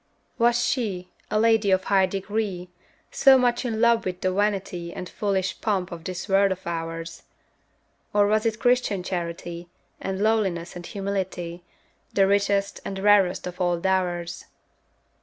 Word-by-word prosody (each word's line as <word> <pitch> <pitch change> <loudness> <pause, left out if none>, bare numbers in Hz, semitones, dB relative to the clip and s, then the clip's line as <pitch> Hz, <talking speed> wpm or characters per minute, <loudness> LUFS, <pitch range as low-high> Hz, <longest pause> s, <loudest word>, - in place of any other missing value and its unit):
Was 240 +1 +3
she, 190 -8 -2 0.2
a 215 - +1
lady 225 -2 +3
of 190 0 +3
high 190 -1 +3
degree, 195 -1 -3 0.4
So 270 -1 +6
much 245 -1 +1
in 225 -3 -2
love 235 0 +4
with 180 -1 -4
the 185 0 0
vanity 195 -4 -1
And 180 - -6
foolish 195 -2 -2
pomp 190 -4 -1
of 165 -1 -8
this 185 +1 -5
world 195 0 +4
of 185 - -5
ours? 165 0 -5 0.9
Or 205 0 +4
was 215 +2 +2
it 220 -1 -1
Christian 245 -6 +1
charity, 170 -1 -5 0.3
And 190 0 -3
lowliness 195 -6 0
and 175 -1 -8
humility, 190 -3 -4 0.5
The 195 - +4
richest 200 0 +1
and 195 - -5
rarest 195 -2 +3
of 180 +1 -6
all 175 -1 +1
dowers? 180 -2 -1
195 Hz, 150 wpm, -25 LUFS, 180-210 Hz, 0.9 s, So